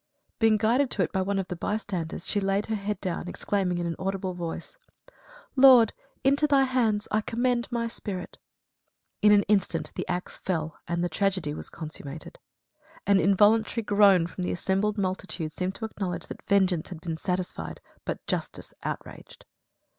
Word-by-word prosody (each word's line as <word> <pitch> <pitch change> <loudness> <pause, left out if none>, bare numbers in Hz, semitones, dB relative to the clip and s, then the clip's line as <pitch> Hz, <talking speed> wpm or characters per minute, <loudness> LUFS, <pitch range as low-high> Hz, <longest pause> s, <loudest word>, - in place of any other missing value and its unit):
Being 225 -2 +5
guided 240 +6 +2
to 200 - +1
it - - -2
by 190 - 0
one 200 +1 0
of 190 -1 -1
the 180 - -4
bystanders, 180 -4 -3
she 205 - +1
laid 195 +1 0
her 220 - -1
head 210 0 -3
down, 180 -2 -3
exclaiming, 180 -1 -1
in 175 - -2
an 170 -1 -2
audible 190 0 -2
voice: 175 - -6 0.8
"Lord, 255 -5 +8 0.3
into 280 +3 +4
thy 280 -2 +5
hands 230 -5 +1
I 215 - +2
commend 240 +2 0
my 235 -1 0
spirit." 200 -5 -6 0.8
In 210 - +6
an 205 -1 +6
instant 200 -2 0
the - - -4
axe 180 +1 -4
fell, 160 -4 -3
and 170 0 -1
the - - +2
tragedy 185 -3 0
was - - -7
consummated. 155 -2 -8 0.7
An 200 0 +5
involuntary 210 +5 +4
groan 200 -4 +5
from 175 +2 -7
the 180 - -1
assembled 195 +4 0
multitude 185 -4 -2
seemed 185 +3 -3
to 220 - -4
acknowledge 195 -5 -4
that - - -9
vengeance 190 -5 +2
had 180 -4 -7
been 165 -1 -3
satisfied, 180 +1 -3 0.2
but - - -5
justice - - -3
outraged. - - -7
195 Hz, 170 wpm, -27 LUFS, 180-215 Hz, 0.8 s, Lord